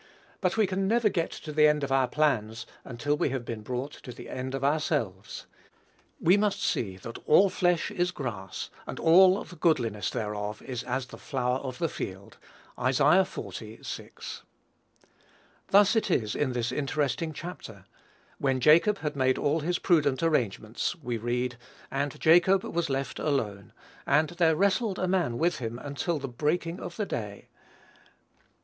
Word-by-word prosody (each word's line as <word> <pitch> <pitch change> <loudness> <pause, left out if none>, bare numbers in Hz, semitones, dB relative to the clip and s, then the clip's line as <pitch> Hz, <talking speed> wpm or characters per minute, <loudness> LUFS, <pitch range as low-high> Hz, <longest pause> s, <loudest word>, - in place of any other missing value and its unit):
But 185 +1 0
we 220 - +4
can 190 0 -1
never 230 0 +3
get 170 -4 -1
to 155 - -8
the 150 0 +5
end 150 -1 +2
of 140 - -2
our 135 -1 +3
plans 120 -7 0 0.2
until 140 +4 -2
we 150 - 0
have 130 -2 -3
been 115 -2 -5
brought 125 +5 -4
to 125 - -8
the 120 - -10
end 130 +1 -4
of 135 - -4
ourselves. 140 - -1 0.7
We 180 +4 +5
must 205 -1 +1
see 115 - -1
that 115 +5 -8
"all 190 +6 +6
flesh 175 -2 +1
is 175 0 0
grass, 110 - -5 0.2
and - - -6
all 185 +4 +6
the 175 - -13
goodliness 120 - +1
thereof 105 -1 -4
is 125 -3 -4
as 130 -1 -2
the 125 - -12
flower 130 -2 -1
of 130 -2 -6
the 165 - 0
field." 95 -8 -7 0.5
(Isa. 145 +8 +5
xl. - - -7
6.) 110 0 -8 1.2
Thus 205 +2 +5
it 220 - +1
is 110 - +1
in 135 -4 -1
this 120 -1 -1
interesting 150 +2 -1
chapter; 145 - -9 0.5
when 135 -2 +1
Jacob 165 - +5
had 150 -2 -3
made 130 -1 +2
all 145 +3 +1
his 175 +3 -1
prudent 150 -7 +2
arrangements, 120 - 0
we 125 -8 -4
read, 120 +2 -2 0.3
"And 140 +1 -2
Jacob 175 +4 +5
was 170 -2 -2
left 135 0 -2
alone; 105 -10 -2 0.4
and 150 +2 +3
there 170 -2 +3
wrestled 200 +3 +1
a 185 - -1
man 175 -11 +1
with 170 +5 +1
him 115 -1 -4
until 145 +5 -2
the 140 -1 -4
breaking 160 +7 -1
of - - -7
the 210 - -1
day." 105 - -6
145 Hz, 165 wpm, -28 LUFS, 120-170 Hz, 1.2 s, all